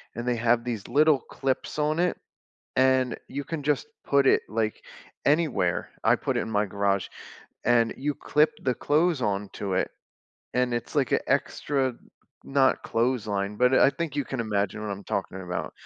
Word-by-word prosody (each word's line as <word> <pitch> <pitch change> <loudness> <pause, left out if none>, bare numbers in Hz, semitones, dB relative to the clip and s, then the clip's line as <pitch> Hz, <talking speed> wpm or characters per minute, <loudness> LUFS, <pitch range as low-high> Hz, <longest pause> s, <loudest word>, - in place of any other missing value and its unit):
and 120 +1 -5
they 125 - +2
have 115 +1 +2
these 115 -5 -4
little 150 +2 +4
clips 135 +3 -3
on 150 +2 +1
it, 180 0 +1 0.6
and 130 -1 +3
you 140 +2 -4
can 160 +1 -4
just 145 -3 0 0.2
put 140 -1 +3
it, - - +5
like, 110 0 -2 0.4
anywhere- 145 - +1
I - - +5
put - - -2
it - - +2
in - - -4
my 105 -1 +2
garage- 100 -1 0 0.6
and 115 -1 +3
you 145 +2 -2
clip 150 +3 +2
the 130 -1 +1
clothes 155 0 +1
onto 100 -1 -2
it, - - +1 0.7
and 125 -1 +1
it's 120 +4 -4
like 140 -4 +1
a - - +3
extra- 135 -3 0 0.5
not 135 -1 +2
clothesline- 105 -4 -1
but 125 +3 +4
I 135 - +6
think 160 -2 -4
you 145 - 0
can 130 -1 -4
imagine 105 -1 -1
what 105 - -4
I'm 100 0 -8
talking 95 0 -3
about, 90 -1 -4
125 Hz, 175 wpm, -26 LUFS, 105-140 Hz, 0.7 s, I